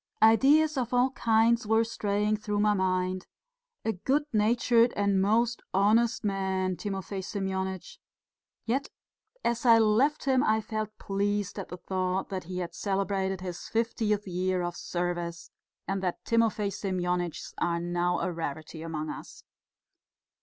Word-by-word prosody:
Ideas 285 +7 +5
of 245 0 -1
all 250 +2 +3
kinds 230 -1 +2
were 220 +1 +4
straying 210 -1 0
through 210 -1 -2
my 210 0 +4
mind. 185 -1 0 0.6
A 225 - +1
good 270 +10 +1
natured 235 +2 +3
and 200 -1 +2
most 230 +4 +2
honest 220 +5 +3
man, 190 -2 0
Timofey 195 0 -4
Semyonitch, 190 -1 -4 0.7
yet, 265 +5 -1 0.6
as 235 0 0
I 230 -2 +7
left 225 +7 +3
him, 265 -1 +3
I 220 -5 +3
felt 215 -1 -4
pleased 200 0 -1
at 195 - -6
the 180 - -6
thought 185 +1 -2
that 185 -3 -4
he 180 +1 -6
had 175 -2 -4
celebrated 195 -1 -1
his 180 -2 -6
fiftieth 220 -2 0
year 185 0 0
of 175 0 -3
service, 175 -1 -3 0.4
and 195 0 -1
that 180 -2 -3
Timofey 225 -3 +1
Semyonitchs 180 -3 -2
are 170 -1 0
now 175 +1 0
a - - -1
rarity 160 -1 -5
among 155 -2 -4
us. - - -10
200 Hz, 140 wpm, -28 LUFS, 185-225 Hz, 0.7 s, I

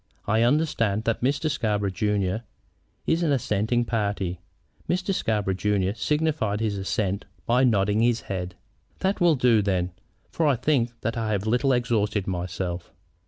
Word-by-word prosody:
I 110 +2 +2
understand 115 -6 +2
that 115 -1 -1
Mr. 140 +5 +1
Scarborough, 105 -9 0
junior, 105 +2 0 0.6
is 165 +1 +1
an 165 -4 +2
assenting 120 -2 +1
party?" 100 -6 -2 0.5
Mr. 180 +2 0
Scarborough, 105 - 0
junior, 100 0 0
signified 145 -4 0
his 110 -2 -1
assent 100 0 -2 0.2
by 125 +2 +3
nodding 105 -3 +3
his 120 0 +2
head. 90 -2 -5 0.5
"That 190 0 0
will 170 -3 +5
do, 125 -4 +4
then, 95 -3 0 0.4
for 160 - +1
I 140 - +4
think 120 -2 0
that 115 +2 -2
I 110 -1 -1
have 100 0 -1
a - - 0
little 130 +3 +2
exhausted 110 -5 +1
myself." 90 -1 -4
110 Hz, 155 wpm, -25 LUFS, 100-125 Hz, 0.6 s, will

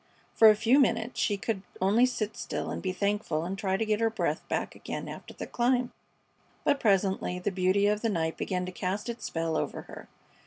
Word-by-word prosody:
For 220 - +8
a 215 - +6
few 235 +6 +4
minutes 230 -2 +1
she 205 - +1
could 195 -1 -2 0.2
only 210 +7 +4
sit 220 -4 -3
still - - -4
and - - -4
be 185 - -1
thankful 200 -5 -1
and 185 +2 -3
try 195 -1 0
to 225 - 0
get 215 -1 +1
her 225 0 +3
breath 225 - -1
back - - -2
again - - -6
after - - -9
the - - -5
climb; 245 0 +1 0.7
but 285 -1 +2
presently 195 -4 +1
the 180 +3 -2
beauty 190 +2 +2
of 210 +1 +2
the 230 - +1
night 165 -5 -1
began 180 -1 -2
to 185 - -5
cast 195 +5 -3
its 235 0 -5
spell 165 -1 -2
over - - -2
her. - - -11
205 Hz, 210 wpm, -29 LUFS, 185-225 Hz, 0.7 s, For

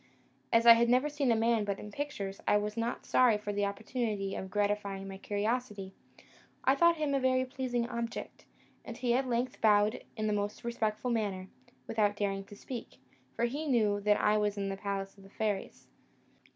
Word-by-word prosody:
As 230 0 +4
I 235 - +12
had 235 +1 +3
never 255 +4 +3
seen 285 -4 +1
a - - +4
man 225 0 +2
but 200 -1 -2
in 210 - -9
pictures, 205 -7 -5
I 210 - +5
was 210 0 -2
not 230 +1 -3
sorry 245 -4 +4
for 205 0 -4
the 205 0 +1
opportunity 210 -1 -3
of 190 - -5
gratifying 205 -1 -1
my 195 0 -8
curiosity. 210 -1 -2 0.7
I 265 - +5
thought 340 +4 +4
him 300 -2 0
a 275 - +2
very 255 0 +2
pleasing 250 -2 -2
object, 235 -1 -5 0.4
and - - -8
he 245 -2 +1
at 260 +1 +1
length 245 +1 -1
bowed 210 0 +3
in 215 - -1
the 210 - +1
most 205 0 -2
respectful 235 0 -1
manner, 200 -5 -2 0.4
without 205 -2 +1
daring 195 -1 -2
to 205 - -12
speak, 240 +3 -8 0.4
for 235 - +1
he 290 +6 -3
knew 215 -6 +2
that 210 0 +3
I 210 0 +3
was 210 -1 0
in 200 -1 -2
the 195 - -3
palace 195 0 -4
of - - -15
the 195 - -15
fairies. 205 -1 -3
215 Hz, 195 wpm, -31 LUFS, 205-245 Hz, 0.7 s, I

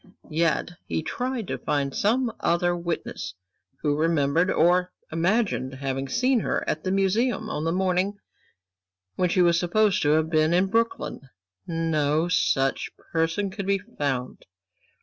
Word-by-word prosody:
Yet 165 +2 +1 0.2
he 160 - -2
tried 250 +5 -3
to - - -3
find 140 -2 -1
some 230 +3 +1
other 175 +1 +1
witness 170 - -4 0.5
who 145 -2 +2
remembered, 160 +2 +2
or 180 +1 +3 0.2
imagined 170 - 0
having 135 0 -3
seen 250 - +2
her - - -2
at 155 - -1
the 185 - -1
Museum 215 +4 +1
on 150 +2 -3
the 165 - +1
morning 190 +2 0 1.0
when 180 -1 +1
she 180 +1 +3
was 170 -1 +4
supposed 200 +3 +2
to 145 - +2
have 160 0 +2
been 160 +1 +2
in 190 +2 +2
Brooklyn. 230 -11 -1 0.4
No 160 -1 +1
such 135 -6 +1 0.2
person 165 +5 0
could 200 -1 -5
be 200 0 +3
found. 145 - -4
175 Hz, 145 wpm, -25 LUFS, 155-200 Hz, 1.0 s, was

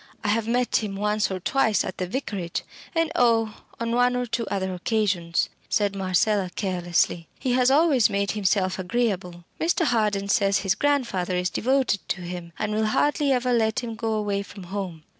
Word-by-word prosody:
I 210 - 0
have 220 +1 +1
met 245 +1 +2
him 210 -3 -3
once 210 +1 0
or 190 -1 -3
twice 220 +2 +2
at 185 - -6
the 185 - -1
Vicarage 195 -6 -3 0.3
and 330 -1 +1
oh! 230 -7 +2 0.2
on 230 0 -2
one 245 +1 +3
or 250 0 0
two 235 -1 -2
other 190 -1 -2
occasions," 180 -3 0 0.2
said 205 -1 +1
Marcella, 195 +1 +1
carelessly. 175 -3 0
"He 260 - -2
has 250 0 +4
always 280 -5 +4
made 200 0 0
himself 190 -2 0
agreeable. 185 -3 -2 0.2
Mr. 335 +1 +1
Harden 210 -6 +1
says 200 -1 +2
his 195 -2 +2
grandfather 235 -12 0
is 180 0 0
devoted 260 -3 +1
to 190 - -2
him, 175 -1 -6
and 215 -1 -2
will 215 0 +1
hardly 290 +5 +2
ever 250 -1 +1
let 220 -1 +1
him 235 -2 -5
go 225 0 -2
away 205 -2 -1
from 200 -1 -10
home. 180 -6 -4
210 Hz, 180 wpm, -25 LUFS, 190-240 Hz, 0.3 s, has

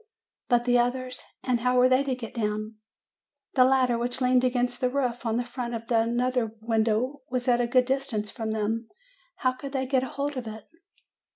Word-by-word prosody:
"But 240 -1 +3
the 245 0 +4
others? 250 +1 -1 0.2
And 250 -2 +1
how 250 +1 +2
were 250 0 +6
they 255 +1 +4
to 265 -2 0
get 235 -3 -8
down? 215 -1 -2 0.8
The 255 - +6
ladder 255 -2 +3
which 245 +2 -2
leaned 250 -1 +3
against 245 -1 0
the 250 - +2
roof 250 -3 -1
on 225 0 +1
the 245 - 0
front 245 -1 -5
of 230 - -5
another 235 0 +1
window 225 +4 0
was 250 0 -2
at 245 -1 +4
a 240 - +1
good 250 +1 +4
distance 255 -6 -2
from 225 -3 -4
them. 220 +1 -2 0.5
How 255 - +1
could 270 +2 -8
they 265 -1 0
get 260 0 +2
hold 280 +2 -3
of 245 -3 -4
it? 220 -1 -7
245 Hz, 195 wpm, -27 LUFS, 230-255 Hz, 0.8 s, were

